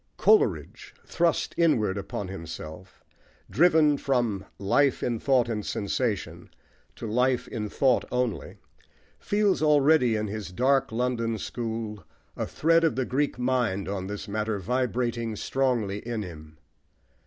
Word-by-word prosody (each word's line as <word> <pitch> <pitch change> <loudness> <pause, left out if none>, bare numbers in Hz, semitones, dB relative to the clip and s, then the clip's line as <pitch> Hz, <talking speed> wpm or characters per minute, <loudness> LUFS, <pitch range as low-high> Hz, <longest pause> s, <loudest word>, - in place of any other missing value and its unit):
Coleridge, 435 - +2
thrust 170 -1 0
inward 115 - +3
upon 100 0 -5
himself, 85 -1 -9 0.5
driven 155 -2 +4
from 120 -9 0
"life 130 +7 +2
in 120 -2 -1
thought 130 -2 +2
and 110 -3 -3
sensation" 105 +1 -3 0.5
to - - -7
life 125 +3 +1
in 105 -2 -4
thought 130 +2 +2
only, 125 -3 -2 0.6
feels 205 -3 +1
already, 145 -5 +4
in 105 0 -1
his 105 -2 -5
dark 135 +6 +2
London 115 -1 -1
school, 110 -3 -5 0.3
a - - -3
thread 165 +1 +2
of 160 -7 +2
the 130 0 0
Greek 140 +2 -1
mind 125 -6 0
on 95 -1 -3
this 105 0 -6
matter 105 +1 -2
vibrating 120 +1 -1
strongly 120 -5 -1
in 115 -1 -4
him. 80 -3 -11
120 Hz, 130 wpm, -26 LUFS, 105-135 Hz, 0.6 s, driven